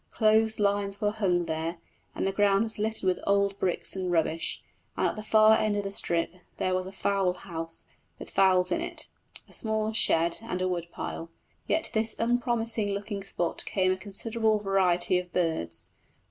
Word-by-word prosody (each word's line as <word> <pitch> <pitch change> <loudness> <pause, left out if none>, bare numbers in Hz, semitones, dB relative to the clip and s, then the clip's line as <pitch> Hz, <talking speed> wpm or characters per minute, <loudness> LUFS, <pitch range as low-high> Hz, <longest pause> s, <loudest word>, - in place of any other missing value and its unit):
Clothes 220 0 +2
lines 200 -1 0
were 205 -1 +1
hung 185 -5 0
there, 165 +2 -3 0.4
and - - -2
the 195 - +1
ground 200 +1 +3
was 220 -1 -4
littered 220 0 -1
with 185 -1 +1
old 200 0 +2
bricks 185 +1 +1
and 185 -2 -2
rubbish, 165 -1 0 0.3
and - - +1
at - - -5
the 215 - -6
far 215 0 +5
end 215 -1 +1
of 205 - -1
the 195 - -4
strip 170 -3 0 0.2
there 185 - 0
was 185 0 -1
a - - -7
fowl 195 -1 0
house 165 -3 -6 0.3
with - - -10
fowls 185 -1 +4
in 335 - 0
it, 345 -2 -5 0.4
a - - -19
small 220 0 -1
shed, 170 -5 +3
and 225 -5 -4
a 185 - 0
wood 175 -2 -2
pile. 165 - -6 0.4
Yet 320 - +1
to - - -1
this 220 0 +2
unpromising 230 -3 +1
looking 200 0 -4
spot 175 -3 -1
came 185 -2 +2
a - - +1
considerable 215 +3 0
variety 185 -3 +2
of 180 -1 -9
birds. 160 - -2
195 Hz, 190 wpm, -28 LUFS, 180-215 Hz, 0.4 s, far